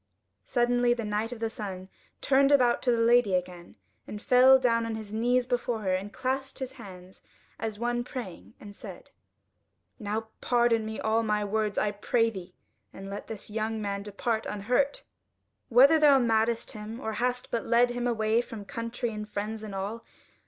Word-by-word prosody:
Suddenly 245 Hz, 0 st, +2 dB
the 230 Hz, -2 st, -4 dB
Knight 210 Hz, +2 st, -2 dB
of 245 Hz, -, -7 dB
the 225 Hz, 0 st, -1 dB
Sun 190 Hz, -4 st, -6 dB, 0.3 s
turned 275 Hz, +1 st, +3 dB
about 250 Hz, -4 st, +4 dB
to 250 Hz, -, +2 dB
the 235 Hz, -, +2 dB
Lady 235 Hz, -4 st, +4 dB
again, 180 Hz, -1 st, -5 dB, 0.3 s
and 210 Hz, -, -6 dB
fell 255 Hz, +3 st, +6 dB
down 230 Hz, -3 st, +1 dB
on 225 Hz, -, -3 dB
his 215 Hz, -1 st, -8 dB
knees 245 Hz, +3 st, +2 dB
before 245 Hz, -2 st, -1 dB
her, 190 Hz, -2 st, 0 dB
and 195 Hz, +2 st, -3 dB
clasped 265 Hz, +2 st, -3 dB
his 260 Hz, -2 st, -5 dB
hands 190 Hz, -7 st, -12 dB, 0.4 s
as 220 Hz, -2 st, -4 dB
one 240 Hz, +1 st, -1 dB
praying, 240 Hz, -8 st, -8 dB
and 205 Hz, -1 st, -11 dB
said: -, -, -11 dB, 0.9 s
"Now 220 Hz, +1 st, -3 dB
pardon 235 Hz, -2 st, +2 dB
me 220 Hz, -, -5 dB
all 220 Hz, +1 st, +1 dB
my 210 Hz, -2 st, 0 dB
words, 210 Hz, 0 st, -1 dB
I 210 Hz, -, +1 dB
pray 225 Hz, +2 st, +1 dB
thee; 185 Hz, -3 st, -10 dB, 0.4 s
and 195 Hz, +1 st, -9 dB
let 200 Hz, -, -7 dB
this 215 Hz, -1 st, -8 dB
young 220 Hz, +1 st, -2 dB
man 200 Hz, -1 st, -3 dB
depart 220 Hz, +2 st, -2 dB
unhurt, 245 Hz, +7 st, 0 dB, 0.7 s
whether 275 Hz, +6 st, +6 dB
thou 290 Hz, -2 st, +6 dB
madest 230 Hz, -1 st, +1 dB
him, 215 Hz, +2 st, -8 dB
or 220 Hz, -4 st, -4 dB
hast 250 Hz, 0 st, -1 dB
but 230 Hz, -, -2 dB
led 240 Hz, +1 st, +4 dB
him 245 Hz, 0 st, -2 dB
away 220 Hz, -1 st, +1 dB
from 225 Hz, -4 st, -9 dB
country 230 Hz, +2 st, -4 dB
and 210 Hz, -1 st, -6 dB
friends 210 Hz, +2 st, -4 dB
and 210 Hz, -2 st, -7 dB
all. 205 Hz, +4 st, -4 dB
225 Hz, 180 wpm, -28 LUFS, 210-245 Hz, 0.9 s, fell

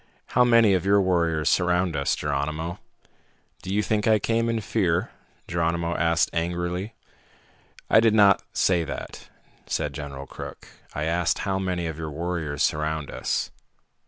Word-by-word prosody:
"How 125 Hz, -, +4 dB
many 115 Hz, -4 st, +5 dB
of 90 Hz, -2 st, +1 dB
your 100 Hz, +1 st, +4 dB
warriors 85 Hz, -4 st, +1 dB
surround 90 Hz, -1 st, +2 dB
us, 70 Hz, 0 st, +1 dB
Geronimo?" 75 Hz, +4 st, -3 dB, 0.8 s
"Do 95 Hz, -, -6 dB
you 105 Hz, +2 st, +1 dB
think 105 Hz, +1 st, 0 dB
I 110 Hz, -1 st, +5 dB
came 115 Hz, +2 st, 0 dB
in 115 Hz, -1 st, 0 dB
fear?" 95 Hz, -5 st, 0 dB, 0.4 s
Geronimo 85 Hz, 0 st, -1 dB
asked 85 Hz, 0 st, +2 dB
angrily. 85 Hz, +5 st, -2 dB, 0.9 s
"I -, -, +6 dB
did 110 Hz, -1 st, +4 dB
not 100 Hz, -3 st, +6 dB
say 90 Hz, -3 st, +2 dB
that," -, -, -7 dB, 0.4 s
said -, -, -2 dB
General 70 Hz, -2 st, -7 dB
Crook. -, -, -9 dB, 0.3 s
"I 75 Hz, -, -2 dB
asked 85 Hz, +2 st, +1 dB
how 95 Hz, -1 st, 0 dB
many 90 Hz, -2 st, -2 dB
of 80 Hz, -1 st, -5 dB
your 80 Hz, -1 st, -4 dB
warriors 80 Hz, -1 st, -3 dB
surround 75 Hz, -1 st, -1 dB
us." -, -, -2 dB
85 Hz, 150 wpm, -25 LUFS, 80-100 Hz, 0.9 s, I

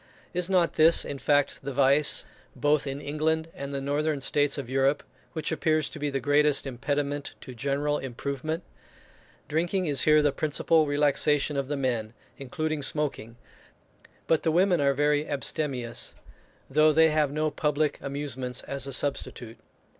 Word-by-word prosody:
Is 180 Hz, 0 st, -1 dB
not 180 Hz, -3 st, +2 dB
this, 160 Hz, +2 st, +6 dB
in 140 Hz, -, -6 dB
fact, 145 Hz, 0 st, +1 dB
the 140 Hz, -, -5 dB
vice, 140 Hz, +2 st, +4 dB, 0.3 s
both 145 Hz, 0 st, +1 dB
in 135 Hz, +1 st, -4 dB
England 160 Hz, +2 st, -1 dB
and 140 Hz, 0 st, -7 dB
the 140 Hz, -, -3 dB
northern 145 Hz, +2 st, -1 dB
states 145 Hz, +1 st, 0 dB
of 140 Hz, -4 st, -5 dB
Europe, 135 Hz, +2 st, +1 dB, 0.3 s
which 160 Hz, -1 st, -3 dB
appears 155 Hz, -1 st, +1 dB
to 155 Hz, -, -8 dB
be 145 Hz, 0 st, -1 dB
the 135 Hz, -1 st, -2 dB
greatest 145 Hz, +2 st, +3 dB
impediment 145 Hz, +2 st, -3 dB
to 130 Hz, -, -9 dB
general 140 Hz, +4 st, -1 dB
improvement? 140 Hz, +5 st, -4 dB, 0.8 s
Drinking 175 Hz, +4 st, 0 dB
is 145 Hz, -4 st, +1 dB
here 155 Hz, -1 st, +5 dB
the 145 Hz, -, +3 dB
principal 155 Hz, +2 st, +2 dB
relaxation 145 Hz, 0 st, +2 dB
of 140 Hz, -1 st, -2 dB
the 145 Hz, 0 st, -2 dB
men, 120 Hz, -5 st, -2 dB, 0.3 s
including 155 Hz, +2 st, -3 dB
smoking, 135 Hz, -5 st, -2 dB, 0.9 s
but 160 Hz, -, +2 dB
the 160 Hz, -, +1 dB
women 180 Hz, 0 st, +3 dB
are 140 Hz, -1 st, +2 dB
very 150 Hz, +1 st, +1 dB
abstemious, 135 Hz, -4 st, -3 dB, 0.5 s
though 155 Hz, +3 st, +4 dB
they 160 Hz, +1 st, +4 dB
have 150 Hz, -2 st, +1 dB
no 155 Hz, +1 st, -1 dB
public 150 Hz, 0 st, -1 dB
amusements 135 Hz, -3 st, -4 dB
as 140 Hz, -1 st, -3 dB
a 135 Hz, -, -5 dB
substitute. 125 Hz, -4 st, -3 dB
145 Hz, 155 wpm, -27 LUFS, 140-155 Hz, 0.9 s, this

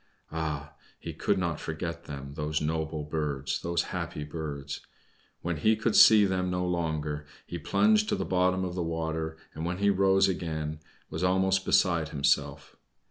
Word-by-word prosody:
Ah! 75 Hz, -3 st, -3 dB, 0.3 s
he -, -, -6 dB
could -, -, 0 dB
not 85 Hz, -4 st, -1 dB
forget 85 Hz, +1 st, -5 dB
them, 70 Hz, -1 st, -7 dB
those 75 Hz, 0 st, -1 dB
noble 80 Hz, 0 st, -2 dB
birds, 70 Hz, -3 st, -2 dB
those 85 Hz, 0 st, 0 dB
happy 75 Hz, -, -3 dB
birds! 75 Hz, -2 st, -5 dB, 0.6 s
When 85 Hz, -1 st, -1 dB
he 110 Hz, +9 st, +3 dB
could 110 Hz, 0 st, 0 dB
see 110 Hz, -2 st, +8 dB
them 90 Hz, -1 st, 0 dB
no 90 Hz, 0 st, -1 dB
longer 80 Hz, -4 st, -2 dB, 0.2 s
he 85 Hz, -, -6 dB
plunged 215 Hz, -, +3 dB
to 210 Hz, -, +2 dB
the -, -, -2 dB
bottom 95 Hz, 0 st, +2 dB
of 90 Hz, -, -4 dB
the 90 Hz, -, -2 dB
water, 80 Hz, -1 st, -2 dB, 0.2 s
and 80 Hz, -, -6 dB
when 90 Hz, +2 st, -2 dB
he 100 Hz, +1 st, +3 dB
rose 95 Hz, 0 st, +4 dB
again 80 Hz, -4 st, -3 dB, 0.3 s
was 80 Hz, -, -3 dB
almost 95 Hz, +1 st, +2 dB
beside 85 Hz, -4 st, +3 dB
himself. 70 Hz, -1 st, 0 dB
80 Hz, 165 wpm, -29 LUFS, 75-90 Hz, 0.6 s, see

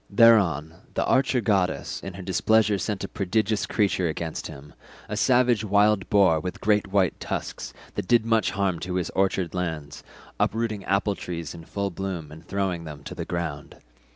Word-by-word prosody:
Thereon 100 Hz, -9 st, +5 dB, 0.2 s
the -, -, +1 dB
archer 130 Hz, -1 st, +2 dB
goddess 100 Hz, -4 st, 0 dB
in 95 Hz, -, -7 dB
her 95 Hz, -, -7 dB
displeasure 105 Hz, +3 st, +2 dB
sent 100 Hz, +1 st, -3 dB
a -, -, -2 dB
prodigious 105 Hz, +2 st, 0 dB
creature 100 Hz, -4 st, +1 dB
against 80 Hz, 0 st, -4 dB
him—a 75 Hz, +8 st, -11 dB
savage 120 Hz, -1 st, +3 dB
wild 105 Hz, -1 st, +3 dB
boar 95 Hz, -6 st, +4 dB
with 90 Hz, +3 st, -5 dB
great 105 Hz, -1 st, +2 dB
white 95 Hz, -2 st, +1 dB
tusks -, -, -4 dB, 0.2 s
that -, -, -4 dB
did 120 Hz, -2 st, +4 dB
much 115 Hz, -1 st, +2 dB
harm 95 Hz, -4 st, -1 dB
to 90 Hz, +1 st, -4 dB
his 90 Hz, -3 st, -1 dB
orchard 95 Hz, -3 st, 0 dB
lands, 80 Hz, -5 st, -4 dB, 0.4 s
uprooting 110 Hz, -3 st, 0 dB
apple 100 Hz, +1 st, +1 dB
trees 85 Hz, -6 st, -6 dB
in 85 Hz, -1 st, -11 dB
full 100 Hz, +2 st, -3 dB
bloom 85 Hz, -4 st, -5 dB
and 80 Hz, +1 st, -13 dB
throwing 95 Hz, -4 st, -1 dB
them 75 Hz, -3 st, -9 dB
to -, -, -7 dB
the -, -, -5 dB
ground. 80 Hz, -4 st, -4 dB
95 Hz, 170 wpm, -25 LUFS, 85-105 Hz, 0.4 s, Thereon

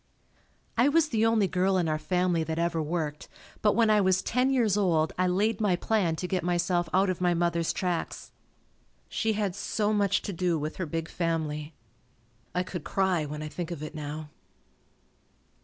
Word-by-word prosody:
I 250 Hz, +4 st, +5 dB
was 320 Hz, 0 st, +3 dB
the 225 Hz, -3 st, +2 dB
only 220 Hz, -3 st, +3 dB
girl 185 Hz, +1 st, +1 dB
in 175 Hz, -3 st, +1 dB
our 155 Hz, -1 st, 0 dB
family 180 Hz, -1 st, +1 dB
that 160 Hz, 0 st, -3 dB
ever 170 Hz, -1 st, 0 dB
worked, 155 Hz, -1 st, -3 dB, 0.3 s
but 210 Hz, -, +3 dB
when 225 Hz, -2 st, +4 dB
I 210 Hz, -1 st, +5 dB
was 185 Hz, -1 st, +2 dB
ten 250 Hz, +2 st, +1 dB
years 235 Hz, -7 st, +2 dB
old 165 Hz, -6 st, +2 dB
I 185 Hz, 0 st, +1 dB
laid 210 Hz, +5 st, +1 dB
my 200 Hz, -4 st, +3 dB
plan 180 Hz, -3 st, +1 dB
to 180 Hz, -, -4 dB
get 185 Hz, -1 st, 0 dB
myself 175 Hz, -1 st, 0 dB
out 190 Hz, +1 st, +3 dB
of 180 Hz, -, -6 dB
my 175 Hz, -1 st, +3 dB
mother's 170 Hz, -1 st, +1 dB
tracks. 180 Hz, -3 st, -3 dB, 0.8 s
She 220 Hz, -1 st, 0 dB
had 205 Hz, -3 st, -1 dB
so 210 Hz, +2 st, -1 dB
much 200 Hz, -2 st, +2 dB
to 200 Hz, -, -4 dB
do 175 Hz, -1 st, 0 dB
with 155 Hz, +1 st, -4 dB
her 185 Hz, -, -3 dB
big 165 Hz, +1 st, -3 dB
family. 160 Hz, -3 st, -2 dB, 0.8 s
I 180 Hz, -, +1 dB
could 180 Hz, -3 st, -6 dB
cry 185 Hz, -5 st, +1 dB
when 150 Hz, +1 st, -5 dB
I -, -, -4 dB
think 170 Hz, +2 st, -5 dB
of 170 Hz, -4 st, -5 dB
it 155 Hz, -, -6 dB
now. 150 Hz, 0 st, -6 dB
180 Hz, 190 wpm, -28 LUFS, 165-200 Hz, 0.8 s, I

